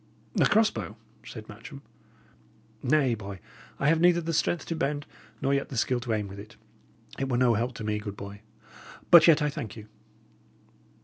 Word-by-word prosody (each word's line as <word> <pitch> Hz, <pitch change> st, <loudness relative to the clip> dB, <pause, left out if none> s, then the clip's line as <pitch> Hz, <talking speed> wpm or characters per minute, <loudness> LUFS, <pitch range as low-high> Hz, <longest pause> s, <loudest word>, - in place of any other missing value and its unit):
"A -, -, +5 dB
cross 220 Hz, 0 st, +4 dB
bow!" 105 Hz, -, -6 dB, 0.3 s
said 110 Hz, -2 st, -9 dB
Matcham. 135 Hz, +7 st, -11 dB, 1.0 s
"Nay, 135 Hz, -2 st, +3 dB
boy, 100 Hz, -3 st, -7 dB, 0.4 s
I 140 Hz, -, +1 dB
have 160 Hz, +1 st, +3 dB
neither 175 Hz, 0 st, +5 dB
the 165 Hz, 0 st, -3 dB
strength 165 Hz, +2 st, 0 dB
to 165 Hz, -, -3 dB
bend 145 Hz, -1 st, -2 dB, 0.4 s
nor 135 Hz, -, +2 dB
yet 140 Hz, 0 st, -1 dB
the 130 Hz, -, -6 dB
skill 125 Hz, +2 st, +1 dB
to 120 Hz, -1 st, -2 dB
aim 105 Hz, -2 st, -1 dB
with 100 Hz, +1 st, -9 dB
it. 105 Hz, +2 st, -12 dB, 0.6 s
It 135 Hz, 0 st, -1 dB
were 125 Hz, -, +1 dB
no 125 Hz, -1 st, +4 dB
help 120 Hz, +3 st, -1 dB
to 110 Hz, -, -6 dB
me, 105 Hz, 0 st, -1 dB
good 100 Hz, -1 st, -7 dB
boy. 100 Hz, 0 st, -9 dB, 0.7 s
But 170 Hz, -2 st, +9 dB
yet 155 Hz, -2 st, +6 dB
I 150 Hz, -, +1 dB
thank 110 Hz, -7 st, -6 dB
you." 110 Hz, -2 st, -10 dB
125 Hz, 190 wpm, -27 LUFS, 105-150 Hz, 1.0 s, But